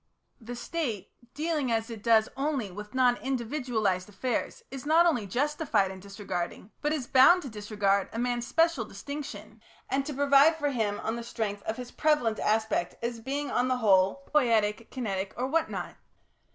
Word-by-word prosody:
The 245 0 -7
State, 240 - -4 0.2
dealing 300 -4 -1
as 225 0 -1
it 225 -2 -7
does 220 -1 +4
only 270 -7 -1
with 210 +6 -9
non 250 -1 +4
individualised 235 -7 -1
affairs, 250 - -3
is 270 -1 -6
not 320 +3 +5
only 245 -12 +1
justified 255 - 0
in 190 - -9
disregarding, 195 0 -5
but 295 - 0
is 300 -5 -1
bound 270 +9 +6
to 275 - -6
disregard, 205 -2 0
a - - -6
man's 240 0 -1
special 330 -6 +2
distinction, 285 +8 -8 0.3
and 270 +1 +1
to 300 - -3
provide 280 +3 +5
for 290 -2 -1
him 215 -5 -1
on 225 +1 -2
the 235 - -5
strength 215 -3 -3
of 220 - -2
his 250 -1 -7
prevalent 300 -8 +1
aspect 220 -4 0
as 235 0 -2
being 280 +5 -3
on 250 - +1
the 255 0 +1
whole 200 +4 +3
poietic, 230 -6 +2
kinetic, 200 -6 -3
or 250 - -1
what 315 +5 +1
not. - - -5
240 Hz, 175 wpm, -28 LUFS, 210-280 Hz, 0.3 s, bound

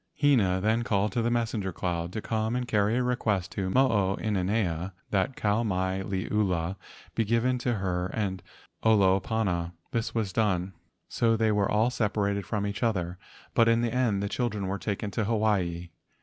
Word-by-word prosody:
Hina 115 -11 +3
then 110 +4 +2
called 105 -3 +1
to 120 - 0
the 115 - +1
messenger 115 -5 -1
cloud 85 0 -3
to 110 - -4
come 110 +1 -1
and 125 -1 -2
carry 105 +1 +2
a 125 - +1
request 105 -7 0
to 95 -2 -2
Mo 130 +7 +4
o 100 -5 +1
inanea 95 -3 -1 0.2
that 100 +7 +1
Kau 105 +2 +1
mai 95 -3 -1
liula 95 -2 -1 0.4
be 115 - +1
given 115 +3 +1
to 120 -1 0
her 90 -3 -1
and 95 -2 -3 0.4
Olopana. 95 -4 +2 0.2
This 115 0 -2
was 110 -4 -1
done. 95 -4 0 0.3
So 115 -1 +2
they 110 -1 +2
were 105 -2 +1
all 110 +4 +2
separated 100 -4 -1
from 105 -2 -1
each 100 0 -4
other, 90 -6 -1 0.3
but 115 - +4
in 115 0 +4
the 120 -1 -1
end 115 -6 +1
the - - 0
children 105 -2 -2
were 95 +1 -2
taken 100 0 -3
to 105 +3 -1
Hawaii. 100 -6 0
105 Hz, 180 wpm, -28 LUFS, 95-115 Hz, 0.4 s, Mo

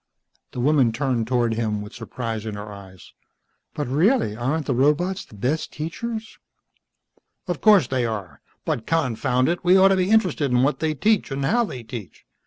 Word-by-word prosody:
The - - -5
woman 135 -2 +3
turned 120 -2 -1
toward 120 -2 +1
him 110 -2 -2
with 105 - -11
surprise 115 -2 -5
in 105 - -4
her 105 0 -7
eyes. 95 -2 -13 0.6
"But 150 - -2
really, 160 - +2
aren't 135 +7 -1
the 135 - 0
robots 150 +9 +1
the - - -16
best 130 +10 -2
teachers?" 220 +9 -6 1.1
"Of 175 -4 -3
course 210 - +6
they 130 0 -1
are. 100 -10 -5 0.2
But 110 - -2
confound 130 -4 +1
it, 175 +1 -1
we 180 +2 +5
ought 190 +1 +6
to 195 - +4
be 185 0 0
interested 180 -10 +2
in 125 0 +3
what 145 +2 +1
they 155 -1 -1
teach 215 +6 +1
and 135 0 -2
how 235 - +2
they 125 - -7
teach. 110 -4 -9
130 Hz, 185 wpm, -23 LUFS, 115-170 Hz, 1.1 s, course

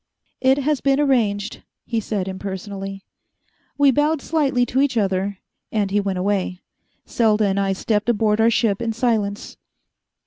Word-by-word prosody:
"It 265 +1 +4
has 285 0 0
been 275 0 +2
arranged," 220 -7 +1 0.2
he 230 -1 -1
said 200 -3 -3
impersonally. 195 0 -6 0.7
We 285 -1 +5
bowed 295 +4 +1
slightly 275 -5 +1
to 260 +2 0
each 275 -4 +1
other, 195 -1 0 0.3
and 205 -3 0
he 205 - +2
went 195 -2 -2
away. 185 -1 -1 0.4
Selda 220 -2 +2
and 195 0 +1
I 195 -1 +1
stepped 210 +3 -1
aboard 215 -1 +2
our 225 - +5
ship 225 -2 +1
in 230 -1 -1
silence. 215 -4 -1
215 Hz, 150 wpm, -21 LUFS, 195-250 Hz, 0.7 s, We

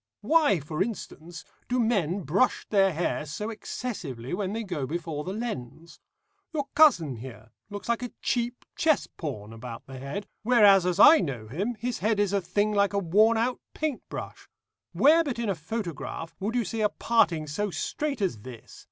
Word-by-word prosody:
Why, 310 - +4
for 155 +2 -4
instance, 175 -6 -5 0.2
do 250 +1 +1
men 200 -6 +1
brush 185 - +1
their 195 -2 +4
hair 165 -1 -1
so 210 +10 -4
excessively 165 - -5
when 190 0 -2
they 225 +2 -3
go 165 -10 -3
before 160 -1 -4
the 185 - -4
lens? 170 - -6 0.6
Your 290 -2 0
cousin 175 - +5
here 110 -2 -10 0.2
looks 205 -1 -7
like 235 0 0
a 245 - -4
cheap 240 0 -2
chess 315 -3 +2
pawn 115 -9 -7
about 115 0 -8
the 135 -1 -9
head, 140 +10 -5 0.2
whereas 205 -5 +6
as 180 +1 0
I 315 +8 +9
know 125 -8 -4
him 195 - -2
his 240 +2 -3
head 215 0 +1
is 205 -1 +1
a 200 - +2
thing 205 +4 0
like 200 0 +2
a - - +1
worn 210 +5 +4
out 245 +2 0 0.2
paint 305 -5 -2
brush. - - -8 0.4
Where 320 +4 +5
but 275 -7 -3
in 235 -3 -2
a - - +2
photograph 165 -2 -5
would 210 +5 -2
you 240 -3 +1
see 220 +4 -3
a 210 - +3
parting 170 -10 +2
so 185 +8 -2
straight 280 - -3
as 120 - -1
this? 120 -1 -11
200 Hz, 185 wpm, -27 LUFS, 155-230 Hz, 0.6 s, I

